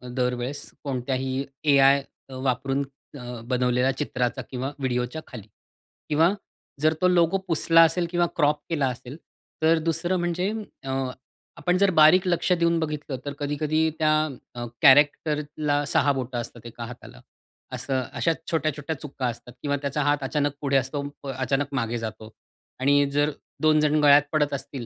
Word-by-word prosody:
दरवेळेस 125 +3 -2
कोणत्याही 130 0 -2 0.3
एआय 140 0 +5 0.3
अ, 130 - -9
वापरून 135 +2 0 0.4
अ, 120 -1 -7
बनवलेला 125 +1 +2
चित्राचा 125 -3 -2
किंवा 130 +1 -3
व्हिडिओच्या 125 +3 -2
खाली. 110 -5 -10 0.6
किंवा 165 +5 +4 0.5
जर 155 +1 +4
तो 180 - +5
लोगो 175 +1 +3
पुसला 165 0 +4
असेल 170 +1 +2
किंवा 175 0 +2
क्रॉप 150 -1 +2
केला 145 -5 +1
असेल, 125 +3 -9 0.5
तर 165 +1 +5
दुसरं 175 +3 0
म्हणजे 175 +3 -1 0.3
अ, 135 - -6 0.7
आपण 180 +3 +1
जर 200 0 +3
बारीक 175 +4 +6
लक्ष 180 +1 +1
देऊन 170 -1 +2
बघितलं, 150 -3 -3
तर 145 - -3
कधी-कधी 155 +2 0
त्या 155 -1 +3 0.4
अ, 120 0 -4 0.2
कॅरेक्टरला 145 +1 +3
6 145 - +4
बोटं 130 -2 -4
असतात 120 0 -10
एका 115 0 -7
हाताला. 125 +1 -11 0.5
असं 130 +1 -1
अशा 165 - +1 0.2
छोट्या-छोट्या 155 -1 -1
चुका 135 -3 -4
असतात 120 +1 -7
किंवा 145 -1 0
त्याचा 140 +1 -1
हात 145 +1 +2
अचानक 145 +1 0
पुढे 140 -1 +2
असतो, 135 +2 -2 0.3
अचानक 135 +2 0
मागे 120 -2 -1
जातो 110 -1 -6 0.5
आणि 145 +1 +4
जर 145 +1 +2 0.3
2 155 0 +4
जण 150 0 +2
गळ्यात 145 0 +7
पडत 150 -2 +1
असतील 135 -2 -5
145 Hz, 150 wpm, -25 LUFS, 130-155 Hz, 0.7 s, गळ्यात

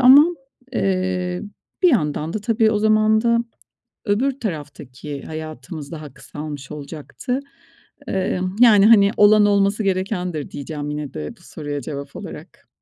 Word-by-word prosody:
Ama, 270 +4 +9 0.5
eee, 185 -3 -1 0.4
bir 360 - +7
yandan 155 - 0
da - - -1
tabii 225 0 +2
o 210 - +1
zaman 215 0 +4
da 235 0 +3 0.7
öbür 260 +7 0
taraftaki 145 - -6
hayatımız 155 -1 -7
daha 150 -4 -8
kısalmış 145 0 -8
olacaktı. 150 - -5 0.7
Eee, 185 -1 -1 0.2
yani, 210 -4 +7
hani, 200 -3 +6
"Olan, 210 0 +6
olması 200 +1 +2
gerekendir." 185 -5 -2
diyeceğim 145 0 -5
yine 150 -1 -5
de 75 -1 -5
bu - - -22
soruya 145 -2 -6
cevap 140 +2 -7
olarak. - - -10
180 Hz, 130 wpm, -21 LUFS, 150-215 Hz, 0.7 s, Ama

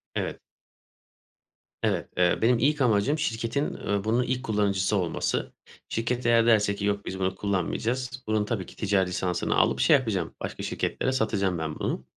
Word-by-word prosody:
Evet. - - -2 1.4
Evet, - - 0
eee, 90 -1 +3
benim 115 +1 +4
ilk 145 +3 +2
amacım 120 +5 +3
şirketin, 120 +1 -1
ııı, 100 -1 -2
bunun 115 +3 +2
ilk 125 0 -2
kullanıcısı 100 -2 +1
olması. 90 -4 -1 0.4
Şirket 120 +2 -2
eğer 115 -1 +5
derse 105 -3 +4
ki 100 - -3
yok 100 0 -1
biz 95 - -5
bunu 95 0 0
kullanmayacağız, 120 +7 -2
bunun 110 -1 +1
tabii 105 -4 -2
ki - - -14
ticari 100 -3 +1
lisansını 90 -1 -1
alıp - - +3
şey - - +6
yapacağım, 105 -11 -1
başka - - -5
şirketlere 130 - -1
satacağım 100 -7 0
ben 80 -1 -4
bunu. - - -2
105 Hz, 160 wpm, -27 LUFS, 95-120 Hz, 1.4 s, şey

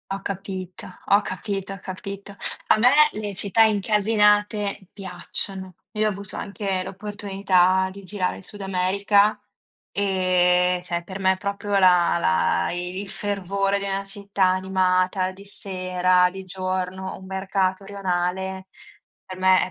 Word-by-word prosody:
Ho 195 - -4
capito, 190 -2 -6 0.2
ho 200 +1 +4
capito, 195 0 -4
ho 195 - -9
capito. 200 +1 -7 0.3
A - - +5
me 240 +3 +6 0.2
le 210 -1 -4
città 200 +3 +1
incasinate 210 -2 +2
piacciono. 190 0 -6 0.2
Io 215 0 +1
ho - - +3
avuto 200 -1 -7
anche 195 -2 -3
l'opportunità 190 -2 +1
di 200 0 -11
girare 185 -1 -2
il - - -8
Sud 205 +2 -7
America 200 +2 +2 0.5
e, 180 -2 +2
cioè, 175 -1 -3
per 190 +2 -7
me 190 -1 +2
proprio 200 +1 -2
la 180 -3 +5
la 85 - +2
i 180 +1 -4
il 200 -1 -6
fervore 200 0 -1
di 200 - -4
una 195 0 -1
città 200 0 -2
animata 185 0 +1
di 195 +2 -13
sera, 185 -2 +1
di 190 +1 -8
giorno, 185 0 -3
un 190 - -12
mercato 190 0 -1
rionale, 190 -1 -2 0.6
per 185 - -8
me 185 0 +5
190 Hz, 135 wpm, -24 LUFS, 185-200 Hz, 0.6 s, me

